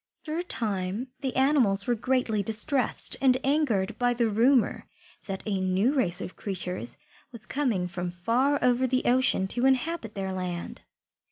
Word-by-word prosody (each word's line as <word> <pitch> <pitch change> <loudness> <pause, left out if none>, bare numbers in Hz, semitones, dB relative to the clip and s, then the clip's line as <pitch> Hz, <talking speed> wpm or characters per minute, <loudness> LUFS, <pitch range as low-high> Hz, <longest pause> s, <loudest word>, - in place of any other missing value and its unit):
After 315 +1 -3
a - - +1
time 210 - -3
the 265 -2 -3
animals 255 -8 +3
were 245 - +1
greatly 235 -2 0
distressed 225 +6 +1
and 260 -2 +4
angered 270 -9 0
by 245 0 +2
the 235 -1 +1
rumour 240 +3 +2 0.4
that 195 -1 -5
a 200 -3 -1
new 190 +8 +1
race 190 -10 +1
of - - -7
creatures 185 +2 -4 0.3
was 235 -3 -2
coming 245 -11 -1
from 180 0 -4
far 235 +11 +1
over 250 +1 +3
the 255 +1 0
ocean 245 -6 +3
to 245 +5 +2
inhabit 265 -3 -1
their 190 -1 -3
land. 180 -2 -5
235 Hz, 160 wpm, -27 LUFS, 190-260 Hz, 0.4 s, and